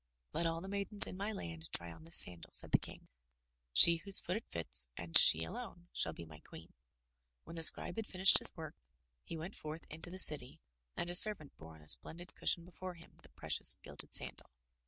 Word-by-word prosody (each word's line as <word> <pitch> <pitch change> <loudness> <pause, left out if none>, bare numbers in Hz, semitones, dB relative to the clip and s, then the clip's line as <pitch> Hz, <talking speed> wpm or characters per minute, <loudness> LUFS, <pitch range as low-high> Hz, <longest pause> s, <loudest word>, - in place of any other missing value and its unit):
"Let 170 - -4
all 165 0 -6
the 190 - -11
maidens 200 +1 -3
in - - -11
my 200 +3 -6
land 85 - -9
try 85 0 -5
on 160 - -17
this 165 - -1
sandal," 85 -2 +3
said - - +3
the - - +2
King. - - -13 0.6
"She 170 - +7
whose 195 +4 +6
foot 180 - -6
it 220 - -9
fits, 80 -6 -3
and 85 -1 -11
she 80 +1 +4
alone, 175 - -11
shall 80 - -1
be 85 - -13
my 75 -2 -16
queen." - - -17 0.7
When 165 - -14
the 165 - -8
Scribe 160 - +5
had 220 -1 -7
finished 190 +1 +4
his - - -4
work, - - -11 0.5
he 165 - -10
went 170 +5 -10
forth 155 +2 -11
into 160 +3 -9
the 185 - -10
city 150 -8 +3 0.4
and 175 - -6
a - - -8
servant 180 -5 +4
bore 80 0 -16
on 75 - -20
a - - -22
splendid 175 - -1
cushion 170 - -2
before 185 0 -11
him 170 0 -19
the - - -20
precious - - 0
gilded - - -11
sandal. - - -3
165 Hz, 215 wpm, -32 LUFS, -, 0.7 s, She